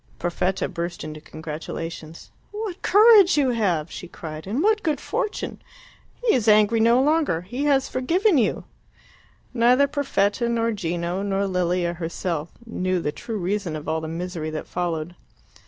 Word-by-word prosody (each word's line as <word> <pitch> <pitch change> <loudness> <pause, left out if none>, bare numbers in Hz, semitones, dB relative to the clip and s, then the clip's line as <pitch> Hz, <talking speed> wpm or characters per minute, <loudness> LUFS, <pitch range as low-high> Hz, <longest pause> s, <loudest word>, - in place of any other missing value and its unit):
Perfetta 180 +2 -1
burst 170 +1 -5
into 155 0 -7
congratulations. 160 +1 -7 0.2
"What 415 -3 -5
courage 410 -4 +6
you 270 -3 +3
have!" 180 -9 0
she 180 - -7
cried; 160 -1 -8
"and 240 - -1
what 430 +1 +3
good 310 -3 0
fortune! 420 - -3 0.6
He 455 - +5
is 235 -3 +1
angry 215 +1 +5
no 235 +2 +5
longer! 295 - +2
He 245 +10 -4
has 275 -2 +3
forgiven 330 - +2
you!" 220 - 0 0.9
Neither 250 +3 +4
Perfetta, 240 -5 0
nor 230 0 +1
Gino, 175 -2 -2
nor 200 0 0
Lilia 180 -2 0
herself 170 -1 -3 0.2
knew 185 -5 -1
the 150 -3 -2
true 220 +8 -6
reason 190 -2 -2
of 150 0 -7
all 160 0 -1
the 160 - -5
misery 165 -1 -4
that 155 0 -5
followed. 170 -2 -3
195 Hz, 155 wpm, -23 LUFS, 170-255 Hz, 0.9 s, courage